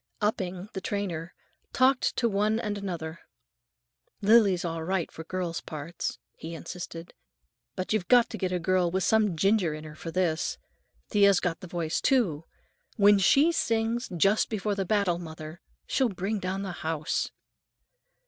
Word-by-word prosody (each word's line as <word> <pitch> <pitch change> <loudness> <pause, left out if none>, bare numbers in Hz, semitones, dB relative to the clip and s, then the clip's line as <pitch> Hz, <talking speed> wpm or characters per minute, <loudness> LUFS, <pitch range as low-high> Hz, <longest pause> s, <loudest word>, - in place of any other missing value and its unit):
Upping, 190 -2 -2
the 190 - -4
trainer, 180 -4 -3 0.4
talked 260 0 +3
to 235 - +2
one 215 +1 +1
and 210 -3 -2
another: 170 -5 -5 1.0
"Lily's 200 -4 +4
all 165 -1 -3
right 185 0 -1
for 160 - -8
girl 175 0 -3
parts," 155 +3 -5 0.2
he 165 +1 -7
insisted, 170 0 -7 0.6
"but 185 +3 -2
you've 200 -5 0
got 245 -1 +6
to 220 - -4
get 185 -2 -1
a 180 - +1
girl 180 0 +2
with 190 +2 -1
some 210 -6 +2
ginger 195 -3 +2
in 155 - -8
her 155 -1 -9
for 160 +2 -8
this. 165 -1 0 0.5
Thea's 200 -3 +5
got 170 -2 -2
the 185 - -9
voice, 170 -2 -2
too. 185 - +2 0.5
When 205 -1 +6
she 280 - +5
sings, 230 -4 0
'Just 195 +6 +3
Before 210 -1 -1
the 195 -1 -2
Battle, 195 -3 +1
Mother,' 160 -1 -9 0.2
she'll 260 -3 +1
bring 200 +2 -2
down 190 +1 -3
the 190 - -4
house." 155 -2 -1
185 Hz, 160 wpm, -28 LUFS, 170-210 Hz, 1.0 s, got